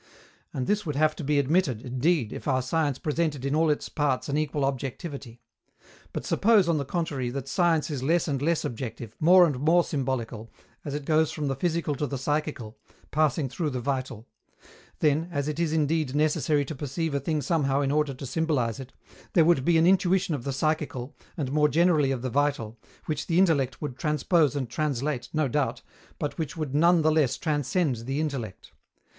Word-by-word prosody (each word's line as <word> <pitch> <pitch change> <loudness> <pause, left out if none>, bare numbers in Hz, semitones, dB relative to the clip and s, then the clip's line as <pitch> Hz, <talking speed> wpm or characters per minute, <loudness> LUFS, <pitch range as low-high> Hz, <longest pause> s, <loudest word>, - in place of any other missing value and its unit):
And 130 -2 -3
this 210 +5 0
would 150 -4 -4
have 155 +1 +2
to 160 - -5
be 145 +1 +1
admitted, 140 -4 +1
indeed, 130 0 0
if - - -7
our 130 -2 +1
science 145 0 0
presented 150 -2 -1
in 140 - 0
all 160 +1 +3
its 150 - 0
parts 145 -4 -1
an 140 - 0
equal 150 -2 0
objectivity. 135 -2 -5 0.7
But - - -5
suppose, 210 -4 +4
on 165 -3 +2
the 140 - -3
contrary, 140 -5 -2
that 135 +1 -5
science 165 0 +1
is 140 -4 -3
less 165 +6 +1
and 140 -3 -1
less 165 +2 +1
objective, 115 -2 -6
more 180 +3 +7
and 145 -6 -1
more 165 +5 +4
symbolical, 120 -6 -3 0.3
as 145 -1 -4
it 145 -1 -5
goes 155 0 +2
from 150 -3 -3
the 135 - -1
physical 170 -3 -1
to 150 - -1
the 140 - -4
psychical, 140 -4 -3 0.3
passing 155 -1 +1
through 155 +4 -2
the 130 -3 -3
vital: 130 -3 -3 0.7
then, 155 +3 +2
as 145 -3 -2
it 150 +1 -3
is 170 -2 +1
indeed 155 -3 0
necessary 150 -1 +2
to 145 - -5
perceive 150 +3 -3
a 140 - +1
thing 155 +3 -1
somehow 145 -3 +1
in 140 -1 0
order 150 -2 +1
to 135 - -8
symbolize 135 -6 -1
it, 130 -1 -9 0.4
there 165 -3 +5
would 165 -6 +3
be 170 +3 +3
an 160 - +4
intuition 185 -1 +3
of 135 -5 -4
the 140 - -1
psychical, 145 -2 -2 0.2
and 140 -5 -2
more 150 +1 +3
generally 160 -3 +3
of 130 -2 -2
the 130 - -2
vital, 130 -5 -1 0.3
which 150 -2 -3
the 170 - +1
intellect 145 -9 +2
would 145 -4 -4
transpose 150 0 +2
and 135 -3 -2
translate, 140 0 -2
no 155 -2 +1
doubt, 130 -3 -1 0.3
but 150 +2 -4
which 155 -1 -4
would 150 -4 -3
none 170 +2 +4
the 155 - +4
less 155 -6 +2
transcend 150 -2 0
the 135 +5 -3
intellect. 135 -11 -4
145 Hz, 195 wpm, -26 LUFS, 135-160 Hz, 0.7 s, more